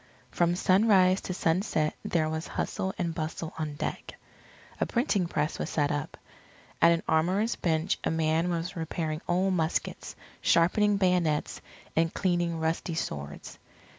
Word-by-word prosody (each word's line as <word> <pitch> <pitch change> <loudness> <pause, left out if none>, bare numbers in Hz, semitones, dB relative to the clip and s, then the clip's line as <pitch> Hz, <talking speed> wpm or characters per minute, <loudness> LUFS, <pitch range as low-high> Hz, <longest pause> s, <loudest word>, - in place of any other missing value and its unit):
From 175 0 +2
sunrise 190 0 +4
to 185 - -4
sunset 165 -3 0
there 160 -2 +1
was 160 +1 -3
hustle 190 - -2
and 170 -2 -1
bustle 160 0 -4
on 150 -2 -3
deck. - - -5 0.6
A - - +1
printing 230 - +1
press 150 -1 -2
was - - -2
set 145 -2 +1
up. 145 -1 -3 0.6
At 170 - +7
an 165 0 +1
armourer's 185 +8 +2
bench 160 0 0
a - - +1
man 160 +1 +1
was 170 +2 -2
repairing 160 -1 -3
old 185 +2 +2
muskets, 160 -2 -2 0.3
sharpening 205 +5 +3
bayonets, 180 -5 +1 0.3
and 165 0 +2
cleaning 175 -3 0
rusty 160 +1 -1
swords. 75 - -5
170 Hz, 140 wpm, -28 LUFS, 160-185 Hz, 0.6 s, At